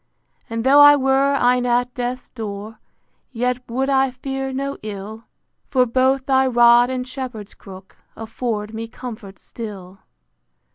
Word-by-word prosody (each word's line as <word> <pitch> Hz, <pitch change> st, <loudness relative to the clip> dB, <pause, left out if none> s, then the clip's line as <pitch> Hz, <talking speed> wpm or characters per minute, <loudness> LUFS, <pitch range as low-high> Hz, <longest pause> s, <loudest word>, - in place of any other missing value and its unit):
And 230 Hz, 0 st, -3 dB
tho' 275 Hz, +3 st, +5 dB
I 290 Hz, 0 st, +9 dB
were 270 Hz, 0 st, +2 dB
e'en 250 Hz, -1 st, +2 dB
at 245 Hz, +1 st, 0 dB
death's 250 Hz, 0 st, -4 dB
door, 215 Hz, -1 st, -7 dB, 0.5 s
Yet 250 Hz, +1 st, -1 dB
would 260 Hz, +3 st, -1 dB
I 270 Hz, -1 st, +2 dB
fear 270 Hz, +1 st, -5 dB
no 275 Hz, +1 st, -4 dB
ill: 215 Hz, +2 st, -8 dB, 0.4 s
For 255 Hz, -2 st, +3 dB
both 260 Hz, +2 st, +1 dB
thy 265 Hz, -1 st, +3 dB
rod 240 Hz, 0 st, +5 dB
and 255 Hz, -1 st, -4 dB
shepherd's 250 Hz, -6 st, -7 dB
crook 190 Hz, -1 st, -14 dB, 0.2 s
Afford 225 Hz, -1 st, -4 dB
me 225 Hz, +1 st, -5 dB
comfort 225 Hz, -5 st, -9 dB
still. 195 Hz, -4 st, -10 dB
245 Hz, 140 wpm, -20 LUFS, 220-265 Hz, 0.5 s, I